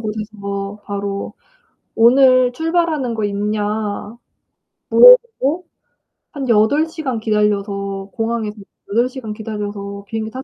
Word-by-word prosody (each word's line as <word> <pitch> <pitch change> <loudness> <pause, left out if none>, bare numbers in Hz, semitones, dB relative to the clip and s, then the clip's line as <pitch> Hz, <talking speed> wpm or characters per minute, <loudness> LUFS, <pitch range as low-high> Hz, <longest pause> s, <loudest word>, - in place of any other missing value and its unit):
곳에서 210 -2 -5
바로 200 0 -4 0.6
"오늘 255 +1 +5
출발하는 320 -3 -1
거 220 -1 -3
있냐?" 210 +1 -3 0.7
물어보고 455 - +5 0.7
한 275 -4 -5
8 230 +9 +3
시간 300 -8 -4
기다려서 200 -2 -1
공항에서 225 -2 -3 0.3
8 235 +4 +2
시간 250 -5 -7
기다려서 205 -2 -6
비행기 220 0 -4
탔 260 +2 -7
220 Hz, 225 characters per minute, -18 LUFS, 205-255 Hz, 0.7 s, 오늘